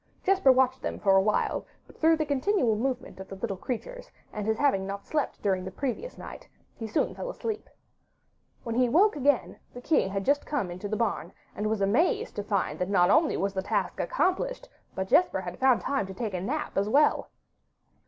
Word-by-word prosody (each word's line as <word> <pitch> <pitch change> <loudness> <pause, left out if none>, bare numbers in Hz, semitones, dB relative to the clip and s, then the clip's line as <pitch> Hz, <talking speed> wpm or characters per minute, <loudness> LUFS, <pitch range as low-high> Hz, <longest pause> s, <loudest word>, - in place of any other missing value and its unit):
Jesper 380 -8 +5
watched 260 0 +2
them - - -3
for 195 -2 +3
a 190 - +6
while, 210 +2 0 0.2
but - - -18
through 320 0 +3
the 310 - 0
continual 285 - +1
movement 255 -1 -3
of 190 - -8
the 195 - -8
little 195 0 -3
creatures, - - -6 0.2
and 210 -1 -4
his 220 0 +1
not 290 - +1
having 190 0 -3
slept 300 -3 -2
during 190 -2 +1
the 190 - -5
previous 275 - -4
night, - - -10 0.3
he 225 - -6
soon 215 - 0
fell - - -6
sound - - -6
asleep. 440 -2 -4 0.9
When 230 - -3
he 250 +1 +2
woke 390 - +4
again, 285 -2 +1 0.2
the - - -6
king 250 - +1
had 195 0 -3
just 285 +1 +2
come 250 -12 -2
into 185 +4 -6
the 215 - -1
barn, 205 -6 -2 0.2
and 210 +1 -1
was 220 -2 -1
amazed 345 - +1
to 205 - -2
find 200 -2 -1
that 180 +1 -1
not 185 -1 +4
only 310 +3 +3
was 195 0 -1
the 190 - -1
task - - -2
accomplished, - - -1 0.3
but 190 0 -2
that - - -7
Jesper 360 - +3
had - - -7
found 260 -2 +4
time 275 -8 -1
to 190 - -8
take 215 -1 -4
a 180 - -2
nap 285 +3 -2
as 200 +1 -1
well. 290 +6 +3
235 Hz, 215 wpm, -28 LUFS, 195-300 Hz, 0.9 s, a